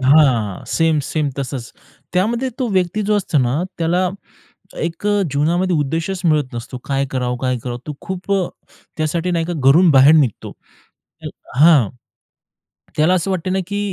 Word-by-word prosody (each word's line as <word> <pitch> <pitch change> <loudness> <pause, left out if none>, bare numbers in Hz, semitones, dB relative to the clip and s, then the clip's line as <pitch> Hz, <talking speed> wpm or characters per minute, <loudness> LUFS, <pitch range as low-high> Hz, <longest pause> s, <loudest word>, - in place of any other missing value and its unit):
हां. 130 -8 +3
सेम-सेम 155 -2 0
तसचं. 135 0 -3 0.5
त्यामध्ये 230 +8 0
तो 255 - 0
व्यक्ती 185 +2 0
जो 210 +1 +1
असतो 180 -6 0
ना 130 +6 +1 0.2
त्याला 175 +3 +1 0.7
एक 165 +5 -4
अ, 205 -1 +2
जीवनामध्ये 170 +5 +1
उद्देशचं 165 +5 -1
मिळत 145 -5 +1
नसतो. 120 +2 -6
काय 140 0 -1
करावं? 125 -1 -2
काय 130 -1 -1
करावं? 120 -1 -4
तो 150 - -4
खूप 190 +1 -5
अ, 190 -3 +1 0.5
त्यासाठी 165 +3 -1
नाही 170 -2 0
का 175 - -3 0.2
घरून 165 +5 +6
बाहेर 140 +2 +7
निघतो. 140 -9 +1 1.1
हां. 150 - +6 1.1
त्याला 160 +4 +3
असं 185 +1 -1
वाटतं 185 0 -2
ना 190 - +1
की 205 +2 -3
160 Hz, 150 wpm, -19 LUFS, 135-185 Hz, 1.1 s, बाहेर